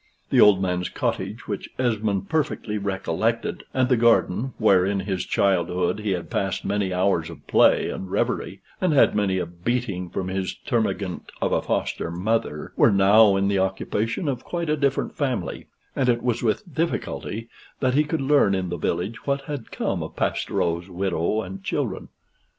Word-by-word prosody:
The -, -, +5 dB
old 100 Hz, -2 st, +7 dB
man's 90 Hz, -1 st, -1 dB
cottage, -, -, -3 dB
which -, -, -4 dB
Esmond 110 Hz, -6 st, 0 dB
perfectly 135 Hz, -8 st, -1 dB
recollected, 100 Hz, +3 st, -1 dB
and 130 Hz, -1 st, +2 dB
the 125 Hz, -, +4 dB
garden 115 Hz, 0 st, +2 dB
(where 100 Hz, -5 st, +4 dB
in 100 Hz, +1 st, 0 dB
his 95 Hz, -2 st, -3 dB
childhood 90 Hz, 0 st, +1 dB
he 105 Hz, -1 st, -3 dB
had 90 Hz, -2 st, -5 dB
passed 95 Hz, 0 st, -1 dB
many 100 Hz, -2 st, 0 dB
hours 90 Hz, -3 st, +1 dB
of 85 Hz, -, -12 dB
play -, -, +4 dB
and 95 Hz, -, -6 dB
reverie, -, -, -1 dB, 0.2 s
and 180 Hz, -4 st, +2 dB
had 140 Hz, -, +5 dB
many 100 Hz, -3 st, +1 dB
a 90 Hz, -, -1 dB
beating 90 Hz, +1 st, -3 dB
from 95 Hz, +1 st, -3 dB
his 95 Hz, 0 st, -2 dB
termagant 110 Hz, -7 st, -1 dB
of -, -, 0 dB
a -, -, +2 dB
foster -, -, -2 dB
mother), 90 Hz, -3 st, -2 dB
were -, -, +5 dB
now 100 Hz, +1 st, +6 dB
in 95 Hz, 0 st, +1 dB
the 100 Hz, -1 st, +1 dB
occupation 105 Hz, -, -1 dB
of 130 Hz, -3 st, -2 dB
quite 170 Hz, -3 st, -2 dB
a -, -, +3 dB
different 140 Hz, -2 st, 0 dB
family; 130 Hz, -, -2 dB, 0.3 s
and 130 Hz, -2 st, +1 dB
it 120 Hz, -1 st, +1 dB
was 120 Hz, -2 st, 0 dB
with 140 Hz, -, -1 dB
difficulty 125 Hz, -7 st, -2 dB, 0.3 s
that 130 Hz, -2 st, +1 dB
he 150 Hz, +3 st, +4 dB
could 155 Hz, +1 st, -2 dB
learn 135 Hz, -8 st, +4 dB
in 95 Hz, -1 st, -2 dB
the 85 Hz, -, -3 dB
village 90 Hz, -, -3 dB
what 140 Hz, 0 st, +1 dB
had 140 Hz, -4 st, -6 dB
come -, -, -2 dB
of -, -, -7 dB
Pastoureau's 85 Hz, +2 st, -1 dB
widow 95 Hz, +3 st, -1 dB
and 95 Hz, +1 st, -8 dB
children. -, -, -2 dB
100 Hz, 175 wpm, -24 LUFS, 95-125 Hz, 0.3 s, old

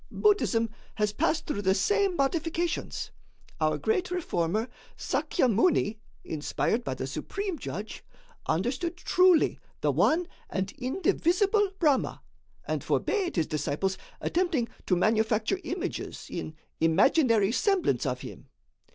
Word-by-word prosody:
Buddhism 235 Hz, -, +2 dB, 0.2 s
has 210 Hz, -1 st, 0 dB
passed 320 Hz, +6 st, 0 dB
through 205 Hz, -9 st, -2 dB
the 190 Hz, -1 st, +3 dB
same 400 Hz, -, +2 dB
modifications. 330 Hz, +4 st, -1 dB, 0.5 s
Our 155 Hz, -1 st, +2 dB
great 220 Hz, -, 0 dB
reformer, 220 Hz, -, -1 dB, 0.3 s
Sakya 305 Hz, -, 0 dB
Muni, 220 Hz, -, +2 dB, 0.2 s
inspired 160 Hz, +9 st, -1 dB
by 130 Hz, -, -3 dB
the 130 Hz, -, -4 dB
Supreme 325 Hz, -, -4 dB
Judge, 210 Hz, -2 st, -6 dB, 0.4 s
understood 260 Hz, -, -1 dB
truly 360 Hz, -2 st, +4 dB, 0.2 s
the -, -, +2 dB
one 335 Hz, +2 st, +2 dB, 0.2 s
and 190 Hz, 0 st, -2 dB
indivisible 375 Hz, -, +2 dB
Brahma, 295 Hz, -7 st, +1 dB, 0.4 s
and -, -, -2 dB
forbade 395 Hz, -5 st, 0 dB
his 165 Hz, -4 st, +2 dB
disciples 155 Hz, +5 st, -1 dB, 0.2 s
attempting 335 Hz, -10 st, 0 dB, 0.2 s
to 180 Hz, -, +3 dB
manufacture 220 Hz, -, +2 dB
images 345 Hz, +2 st, -4 dB
in 155 Hz, -, -5 dB, 0.2 s
imaginary 210 Hz, -, +4 dB
semblance 390 Hz, -, +1 dB
of -, -, -2 dB
him. -, -, -10 dB
255 Hz, 115 wpm, -28 LUFS, -, 0.5 s, truly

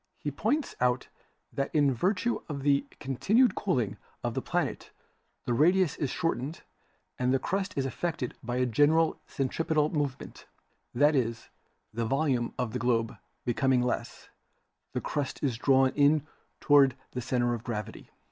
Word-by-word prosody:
He -, -, -4 dB
points 300 Hz, 0 st, -1 dB
out 125 Hz, 0 st, +1 dB, 0.4 s
that 140 Hz, -, -1 dB
in 145 Hz, -3 st, +4 dB
virtue 185 Hz, -, 0 dB
of 140 Hz, -2 st, -4 dB
the 140 Hz, -1 st, +2 dB
continued 210 Hz, -, +2 dB
cooling 125 Hz, -, -1 dB, 0.3 s
of -, -, -1 dB
the -, -, -2 dB
planet -, -, -2 dB, 0.6 s
the 120 Hz, -, 0 dB
radius 170 Hz, +5 st, +3 dB
is 145 Hz, -, -1 dB
shortened 155 Hz, -1 st, -2 dB, 0.6 s
and 125 Hz, 0 st, +2 dB
the 135 Hz, -, +4 dB
crust 190 Hz, +7 st, -2 dB
is 135 Hz, -, +1 dB
affected 140 Hz, -1 st, -3 dB
by 120 Hz, +1 st, -4 dB
a 125 Hz, 0 st, +2 dB
general 145 Hz, +7 st, +3 dB
centripetal 155 Hz, +2 st, 0 dB
movement; 145 Hz, -4 st, -4 dB, 0.5 s
that 145 Hz, +4 st, +4 dB
is, 115 Hz, -3 st, -1 dB, 0.4 s
the 115 Hz, +1 st, -2 dB
volume 135 Hz, -2 st, +1 dB
of 120 Hz, -3 st, -2 dB
the 125 Hz, -, -2 dB
globe 115 Hz, -1 st, +1 dB, 0.3 s
becoming 125 Hz, +1 st, +2 dB
less, 125 Hz, -, -4 dB, 0.6 s
the -, -, -2 dB
crust 145 Hz, -3 st, -3 dB
is 130 Hz, -5 st, +1 dB
drawn 135 Hz, -1 st, +4 dB
in 145 Hz, +1 st, +3 dB, 0.3 s
toward 140 Hz, -3 st, +5 dB, 0.2 s
the 125 Hz, -, -4 dB
center 120 Hz, -1 st, 0 dB
of 115 Hz, -1 st, -5 dB
gravity. 105 Hz, -4 st, -5 dB
135 Hz, 150 wpm, -29 LUFS, 125-155 Hz, 0.6 s, toward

